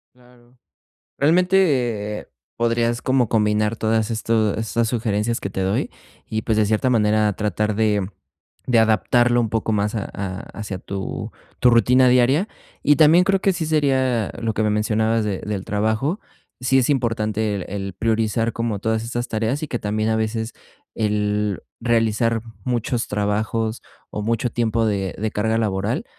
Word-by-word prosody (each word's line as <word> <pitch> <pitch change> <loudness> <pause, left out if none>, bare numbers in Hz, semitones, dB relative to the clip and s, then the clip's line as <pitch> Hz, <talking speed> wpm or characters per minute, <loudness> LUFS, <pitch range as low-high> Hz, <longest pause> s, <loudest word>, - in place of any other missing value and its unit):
Claro. 125 0 -23 0.6
Realmente, 140 - +2 0.3
podrías 115 +1 0
como 130 -3 +2
combinar 105 0 +1
todas 110 0 0
estos 110 -2 +1
estas 115 +1 0
sugerencias 115 -1 -1
que 100 - -4
te 95 - -4
doy 95 +1 0 0.4
y, 110 0 -3
pues, 110 - 0
de 105 -1 +3
cierta 110 +4 +1
manera 105 -2 +3
tratar 105 0 -1
de 105 -3 +1 0.6
de 125 -2 +3
adaptarlo 120 +2 +3
un 115 - 0
poco 110 0 -1
más 105 0 0
a-a 100 -2 -4 0.2
hacia 105 -3 -5
tu 95 +1 -5 0.3
tu 125 - +6
rutina 125 +3 +5
diaria. 130 - +3 0.4
Y 150 - +6
también 165 +4 +6
creo 195 0 +2
que 195 - +2
sí 170 -3 -3
sería 130 -7 +1
lo 115 -2 -1
que 110 - 0
me 105 - +2
mencionabas 110 +1 +1
de 100 -3 -2
del 100 -2 -4
trabajo. 110 - -1 0.4
Sí, 130 +1 +3
es 130 +2 +2
importante 110 -5 0
el 95 - -4
el 100 -1 -5
priorizar 115 +2 0
como 115 -2 -2
todas 110 +2 -1
estas 120 +1 -3
tareas 115 +7 -1
y - - -7
que 120 - -2
también 110 +1 -1
a 110 - +1
veces 110 +1 -2 0.4
el 105 -2 0 0.2
realizar 115 -1 +1 0.2
muchos 120 -1 -1
trabajos 110 +2 -1 0.3
o 105 - -4
mucho 115 +2 0
tiempo 115 -1 0
de 100 -4 -1
de 110 +2 -1
carga 110 +2 0
laboral, 105 - -1
110 Hz, 160 wpm, -21 LUFS, 105-120 Hz, 0.6 s, tu